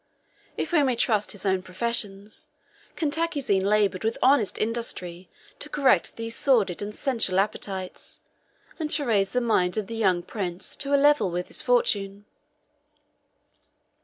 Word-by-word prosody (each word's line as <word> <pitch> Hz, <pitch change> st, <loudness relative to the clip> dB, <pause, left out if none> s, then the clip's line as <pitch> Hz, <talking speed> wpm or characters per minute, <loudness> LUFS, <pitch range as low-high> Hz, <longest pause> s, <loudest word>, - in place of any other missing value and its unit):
If -, -, -3 dB
we 330 Hz, -3 st, +4 dB
may 260 Hz, -3 st, +1 dB
trust 215 Hz, -3 st, +1 dB
his 205 Hz, -1 st, -7 dB
own 190 Hz, -1 st, +1 dB
professions, 200 Hz, +1 st, -3 dB, 0.5 s
Cantacuzene 290 Hz, -, 0 dB
labored 200 Hz, -2 st, +1 dB
with 225 Hz, +1 st, -1 dB
honest 255 Hz, -5 st, +3 dB
industry 190 Hz, -6 st, -3 dB, 0.3 s
to -, -, -4 dB
correct 275 Hz, -3 st, +2 dB
these 230 Hz, 0 st, -4 dB
sordid 220 Hz, -10 st, +2 dB
and 210 Hz, +1 st, -5 dB
sensual 230 Hz, -8 st, 0 dB
appetites, 195 Hz, -2 st, -3 dB, 0.6 s
and 310 Hz, -2 st, -2 dB
to 295 Hz, -1 st, +3 dB
raise 200 Hz, -5 st, +2 dB
the 250 Hz, -, 0 dB
mind 185 Hz, -6 st, +1 dB
of 215 Hz, -, -1 dB
the 230 Hz, -, -7 dB
young 185 Hz, -6 st, +1 dB
prince 180 Hz, -4 st, -4 dB
to 280 Hz, 0 st, +1 dB
a -, -, +5 dB
level 285 Hz, -8 st, +4 dB
with 180 Hz, +1 st, -4 dB
his -, -, +1 dB
fortune. 205 Hz, -, 0 dB
215 Hz, 145 wpm, -25 LUFS, 195-260 Hz, 0.6 s, a